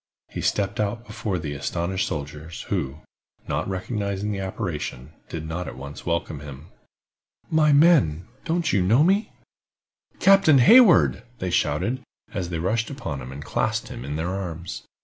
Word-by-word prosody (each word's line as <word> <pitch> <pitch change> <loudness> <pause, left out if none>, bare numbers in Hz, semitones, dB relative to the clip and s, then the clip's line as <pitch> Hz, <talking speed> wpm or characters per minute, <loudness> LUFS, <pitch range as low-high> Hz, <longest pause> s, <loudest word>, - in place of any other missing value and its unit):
He - - -5
stepped 100 -1 0
out 105 +3 -1
before 105 -3 -3
the 80 -4 -4
astonished 85 +6 -2
soldiers, 75 +3 -6
who, 75 -6 -2 0.5
not 75 +5 -2
recognizing 100 +1 -2
the 100 - -3
apparition, 90 - -4 0.2
did 80 -1 -5
not 85 +2 -4
at - - -7
once 70 +5 -9
welcome 85 -3 -1
him. 75 +2 -10 0.8
"My 155 -1 +4
men, 140 - +4 0.2
don't 170 0 0
you 100 - +3
know 110 +11 +4
me?" 195 +5 +2 0.9
"Captain 195 -7 +6
Hayward!" 195 - +7 0.2
they 90 -1 -3
shouted, 130 +8 0 0.3
as 95 -5 -3
they 85 - -2
rushed 110 +8 0
upon 95 - -5
him, 65 +1 -8
and 70 +2 -8
clasped - - -1
him - - -7
in 70 +2 -4
their 80 +3 -2
arms. 90 -3 -5
95 Hz, 155 wpm, -24 LUFS, 80-115 Hz, 0.9 s, Hayward